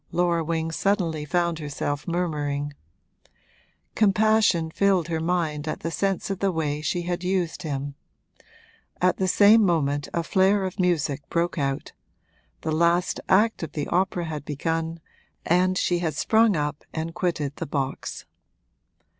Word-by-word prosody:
Laura 170 -1 +1
Wing 165 0 -2
suddenly 165 -4 0
found 170 +1 0
herself 145 -1 -3
murmuring: 145 -4 -2 1.2
compassion 210 -5 +3
filled 190 -3 +2
her 160 -1 -1
mind 160 -3 -1
at - - -3
the 165 - -3
sense 195 +3 -1
of 195 - -3
the 195 -1 +1
way 150 -3 -2
she 175 +3 -1
had 175 +1 -3
used 185 -2 -1
him. 145 -3 -4 1.1
At 180 0 +2
the 190 - 0
same 215 +4 +6
moment 145 -6 +1
a 170 - -1
flare 190 +3 +3
of 185 0 -6
music 160 -6 +1
broke 170 -1 0
out: 135 -1 -2 0.7
the 160 - -2
last 170 +3 +2
act 215 +4 +3
of 160 -3 -5
the 150 -2 -2
opera 180 -1 0
had 155 -3 -5
begun 165 +3 -2 0.5
and 185 +2 +3
she 175 -1 +1
had 160 -4 -2
sprung 220 +4 +3
up 150 -1 -2
and 160 +1 -4
quitted 155 -6 -2
the - - -4
box. 135 -1 -3
170 Hz, 145 wpm, -25 LUFS, 150-185 Hz, 1.2 s, same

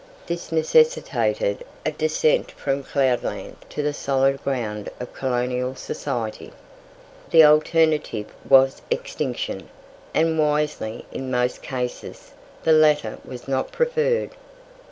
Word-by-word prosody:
This 170 -1 -5
necessitated 485 - +2 0.2
a - - +1
descent 485 +1 +1
from 140 0 -2
cloudland 130 -3 -1
to 150 - -3
the 150 0 0
solid 135 -1 +1
ground 110 -6 -3
of 125 - -7
colonial 125 0 -1
society. 115 -3 -4 0.8
The 160 -1 +8
alternative 155 -6 +3 0.2
was 135 0 +5
extinction, - - -3 0.4
and 160 0 +1
wisely, 150 -7 0
in 130 0 -5
most 125 0 0
cases, 125 -2 -5 0.3
the 160 - +3
latter 150 -7 +3
was 125 0 -10
not 135 -1 -1
preferred. 485 0 +1
145 Hz, 110 wpm, -23 LUFS, 125-165 Hz, 0.8 s, The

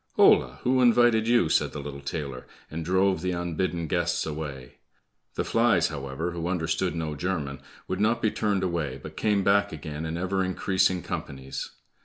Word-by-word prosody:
"Hola! 65 +2 +5
who 130 +1 +3
invited 120 -2 +5
you?" 120 -7 +4
said - - +1
the 75 - -5
little 70 0 -6
tailor, 70 -3 -5 0.2
and 80 +1 -4
drove 95 0 +2
the 90 0 -1
unbidden 85 0 -2
guests 85 +1 0
away. 75 -5 -6 0.6
The - - 0
flies, 115 -8 +3
however, 70 +3 -4
who 85 0 -4
understood 85 -3 -1
no 80 -2 -2
German, 75 -4 -3 0.3
would 95 - -2
not 115 +3 +2
be 110 -2 +1
turned 100 -3 0
away, 80 -7 -2
but - - -10
came 105 -2 +1
back 100 +1 +3
again 75 0 -5
in 80 +1 -3
ever 95 +2 0
increasing 95 -1 +1
companies. 65 -1 -5
85 Hz, 170 wpm, -27 LUFS, 75-95 Hz, 0.6 s, Hola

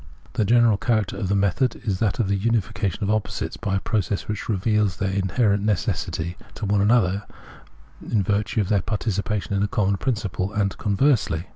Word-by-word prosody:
The 115 -4 +1
general 115 -1 +4
character 110 -4 0
of 95 -5 -3
the 100 - +2
method 100 +6 +1
is 95 -4 -1
that 105 -3 +1
of 115 - +1
the 100 - +1
unification 110 -1 -1
of 100 - +1
opposites 110 -1 -2
by 95 - -2
a - - +2
process 100 -2 -1
which 105 +1 -4
reveals 105 -1 +1
their 95 -2 -1
inherent 100 +2 +1
necessity 90 -3 -1 0.2
to 110 - -4
one 100 0 +2
another 100 -3 +3 0.8
in 105 -4 0
virtue 105 +3 0
of 95 - -2
their 100 -3 +3
participation 105 0 -2
in 100 - +1
a 105 - +2
common 100 -4 +1
principle, 100 -6 -2
and 100 -2 0
conversely. 100 - +1
100 Hz, 180 wpm, -23 LUFS, 95-110 Hz, 0.8 s, general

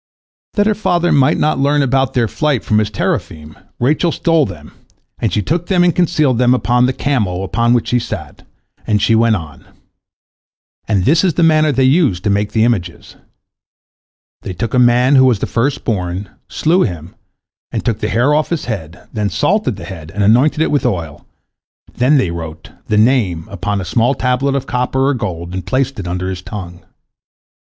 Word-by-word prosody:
That 205 - +2
her 215 - +3
father 175 -4 0
might 135 -3 +3
not 155 -3 0
learn 145 +1 +2
about 135 0 0
their 120 -2 +2
flight 150 0 -1
from 105 - +1
his 105 -1 0
teraphim, 80 -6 -3 0.2
Rachel 150 +7 +1
stole 165 -4 +1
them, 75 -2 -11 0.5
and - - -1
she 105 - 0
took 170 - -2
them 180 -2 +3
and 175 -2 +2
concealed 155 -8 +1
them 125 0 +4
upon 125 0 +2
the - - +1
camel 105 -10 -1
upon 115 +5 +1
which 120 - -1
she 125 - +2
sat, - - -7 0.5
and 105 -1 +2
she 115 - +2
went 115 0 +3
on. 80 -7 -8 1.2
And 100 -4 +1
this 160 +8 +3
is 180 -6 +1
the 170 - +2
manner 155 -1 +4
they 135 -1 +1
used 130 - +2
to 105 - +1
make 100 +1 0
the 110 0 +2
images: 95 -8 -2 1.3
They 95 - -6
took 105 +8 -4
a 125 - +3
man 125 +3 +4
who 130 - +6
was 125 -4 +3
the - - -3
first 125 +4 -1
born, 95 -3 -3 0.2
slew 175 +4 +1
him 85 - -3 0.6
and - - -4
took 115 -4 -1
the 105 - -2
hair 120 +7 +2
off 150 +1 +1
his 170 -3 -2
head, 90 -8 -6
then 105 -2 -1
salted 185 - 0
the 90 -3 -9
head, 80 -4 -9
and 100 +4 -2
anointed 130 +9 +3
it - - -1
with 145 - +1
oil, 85 -11 -3 0.7
then 130 +4 +3
they 95 -10 +1
wrote 80 -2 -8 0.2
"the 105 - +1
Name" 105 -8 +2
upon 100 +1 -2
a 95 - -5
small 120 +9 +1
tablet 130 +2 0
of 135 - -2
copper 130 +2 0
or - - +2
gold, 90 -8 -5
and 95 0 -4
placed 135 -2 -1
it 90 - -5
under 90 +1 -3
his 95 -1 -5
tongue. 90 -4 -8
120 Hz, 195 wpm, -16 LUFS, 95-140 Hz, 1.3 s, who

